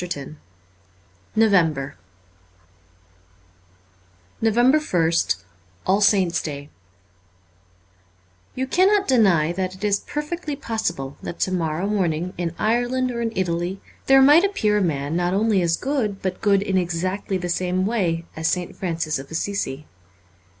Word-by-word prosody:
337 155 -4 -6 1.0
N 225 0 +6
OVEMBER 160 -9 +1 2.5
z2 225 - +2
NOVEMBER 240 - +3
ist 100 - 0 0.4
ALL 195 +2 +2
SAINTS' 190 -5 +3
DAY 145 -1 -7 1.8
YOU 260 - -1
cannot 385 +7 +3
deny 190 - +3
that 185 +1 -3
it 190 - -13
is 200 -1 +2
perfectly 300 0 -4
possible 170 - -3
that 170 - -7
to 185 - 0
morrow 165 0 -1
morning 180 -4 -1
in 170 -1 -3
Ireland 245 +3 0
or 235 -1 -4
in 230 -1 -1
\, - - -17
Italy 175 +1 -1 0.3
there 270 0 +7
might 295 +6 +7
appear 215 - +1
a - - 0
man 145 -3 -1
not 175 +1 0
only 210 -1 +2
as 170 -1 +1
good 245 -8 -2
but 185 -1 -3
good 200 -2 +3
in 190 -2 +1
exactly 185 +3 -2
the 180 -1 -4
same 180 +1 0
way 175 -7 0
as 160 +1 -1
St. 180 0 -2
Francis 165 -5 -2
of 135 - -10
Assisi. 160 -4 -3
185 Hz, 140 wpm, -22 LUFS, 170-225 Hz, 2.5 s, there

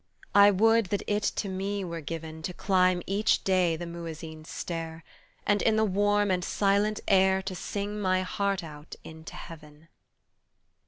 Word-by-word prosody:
I 200 0 +8
would 225 +2 +4
that 200 +2 -2
it 210 0 0
to 205 - -1
me 195 +1 -3
were 170 -2 -5
given 160 0 -6
To 180 +3 -5
climb 185 -2 +2
each 205 +3 +1
day 185 -3 +2
the 175 +2 -6
muezzin's 165 -2 -8
stair 165 -1 -5 0.4
And 205 0 +2
in 220 - +3
the 220 0 +3
warm 205 0 +2
and 180 -1 0
silent 205 +2 +1
air 190 0 +4
To 190 0 -4
sing 205 +3 -4
my 185 -1 +2
heart 195 0 -1
out 150 -1 -10
into 160 0 -10
Heaven. 155 -1 -12
185 Hz, 160 wpm, -28 LUFS, 165-205 Hz, 0.4 s, I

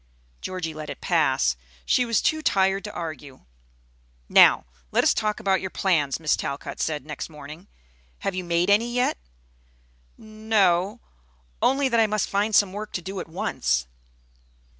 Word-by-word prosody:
Georgie 180 -4 -4
let 155 -1 -7
it 145 - -7
pass. 65 0 +2 0.3
She 250 - +2
was 230 -2 +1
too 315 0 +1
tired 195 -6 +2
to 210 - -5
argue. 155 -7 -7 0.9
"Now, - - +6 0.3
let - - +3
us - - +4
talk 215 0 -1
about 190 -1 +1
your 190 - -4
plans," 160 -9 0
Miss 155 -2 +2
Talcott 140 -2 -5
said 150 -4 -2
next 155 +1 -6
morning. 150 +4 -11 0.5
"Have 195 - -2
you 185 0 -3
made 170 +2 +1
any 230 +4 +3
yet?" 245 - 0 1.0
"N 215 0 -13
o; 195 +2 +3 0.6
only 275 +1 +3
that 235 -3 +2
I 220 - +4
must 215 -1 -1
find 205 +2 +1
some 200 -3 +4
work 210 +1 -6
to 180 - -2
do 195 +1 -5
at 170 - -7
once." 60 - -1
190 Hz, 160 wpm, -24 LUFS, 155-215 Hz, 1.0 s, Now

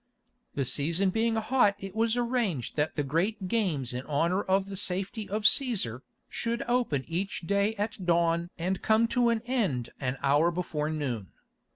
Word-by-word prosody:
The 135 - 0
season 165 +9 +1
being 225 +2 +1
hot 220 -2 +3
it 195 -2 -8
was 225 +1 +1
arranged 235 - -1
that 150 +1 0
the 145 - 0
great 185 +8 -1
games 170 - 0
in 125 - -3
honour 165 +6 +1
of 190 0 +1
the 195 0 -7
safety 195 +2 -1
of 210 +2 -2
Cæsar, 205 - +3 0.3
should 235 0 -2
open 240 - 0
each 185 +4 -3
day 200 +4 +1
at 205 -1 -3
dawn 170 0 +2
and 185 +2 -2
come 220 +1 +3
to 245 -1 +3
an 230 -1 0
end 200 - -1
an 130 -1 -2
hour 145 +4 +4
before 165 -3 -2
noon. 130 -10 -3
190 Hz, 170 wpm, -28 LUFS, 155-220 Hz, 0.3 s, hour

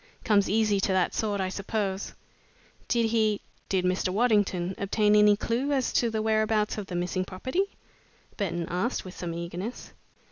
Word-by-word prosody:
Comes 205 -2 +3
easy 210 -1 +2
to 195 - +1
that 185 -1 +2
sort, 205 -2 -1
I 190 -1 0
suppose." 195 0 -3 0.7
"Did 230 -2 +1
he 215 -2 +2 0.3
did 185 -2 +1
Mr. 185 0 +1
Waddington 200 -4 +2
obtain 210 +1 +2
any 210 0 +6
clue 240 +6 -1
as 265 -3 0
to 235 - +2
the 220 -1 -2
whereabouts 215 -1 +1
of 200 - -6
the 180 - -5
missing 180 +1 -1
property?" 260 - -2 0.7
Burton 175 -4 -2
asked, 185 +8 -1
with 185 - -9
some 170 -2 -4
eagerness. 175 +7 -6
205 Hz, 165 wpm, -27 LUFS, 185-220 Hz, 0.7 s, any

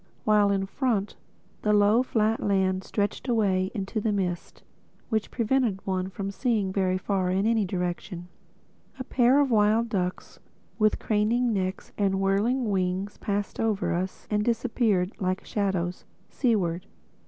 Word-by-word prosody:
While 210 -1 +4
in 195 -1 +1
front, 210 -1 -1 0.5
the 210 - +2
low 210 +3 +5
flat 225 -3 +1
land 190 -2 +1
stretched 205 +6 -2
away 195 -6 +1
into 205 +2 -3
the 220 - 0
mist—which 200 +3 -4
prevented 230 -4 0
one 185 -1 -1
from 195 +1 -5
seeing 210 -4 0
very 185 -1 +1
far 190 -1 -1
in 190 +2 +1
any 225 -2 +2
direction. 180 -1 -4 0.7
A 260 - -4
pair 255 +1 +3
of 280 -3 +2
wild 220 +1 +3
ducks 185 -4 -3 0.4
with 215 0 +3
craning 225 +3 +1
necks 185 -1 -3
and 195 -1 +1
whirring 210 +5 +1
wings 190 +1 -1
passed 205 -1 -3
over 215 -3 0
us 185 +2 -3
and 210 0 +1
disappeared 225 -5 +1
like 185 0 -2
shadows, 190 -4 -2 0.3
seaward. 190 -8 0
205 Hz, 140 wpm, -26 LUFS, 190-220 Hz, 0.7 s, low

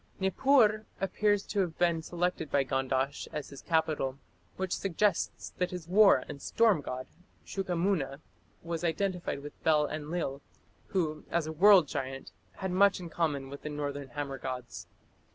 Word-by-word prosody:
Nippur 215 +2 +3
appears 205 +1 +1
to 205 - -2
have 175 -4 0
been 170 -2 +2
selected 175 -2 -2
by 140 - +3
Gandash 135 +1 -1
as 150 -2 -5
his 140 - -10
capital, 155 -5 0 0.4
which 190 -1 -1
suggests 195 0 0
that 180 - +1
his 180 -3 -7
war 195 -6 +6
and 140 -1 -8
storm 220 -9 +3
god, 130 -1 -5 0.4
Shuqamuna, 175 -6 -1 0.4
was 170 0 -4
identified 180 -2 -1
with 145 - -11
Bel 150 -2 +4
Enlil, 150 -2 -3 0.5
who 155 -5 -1
as 170 -2 0
a 155 - -4
"world 185 0 +7
giant" 135 0 -5 0.2
has 190 -1 -4
much 200 +2 +4
in 175 -2 -8
common 150 -5 -1
with 140 +1 -9
the 150 - -5
northern 145 -1 -4
hammer 135 +1 -5
gods. 125 -8 -6
160 Hz, 150 wpm, -30 LUFS, 140-190 Hz, 0.5 s, world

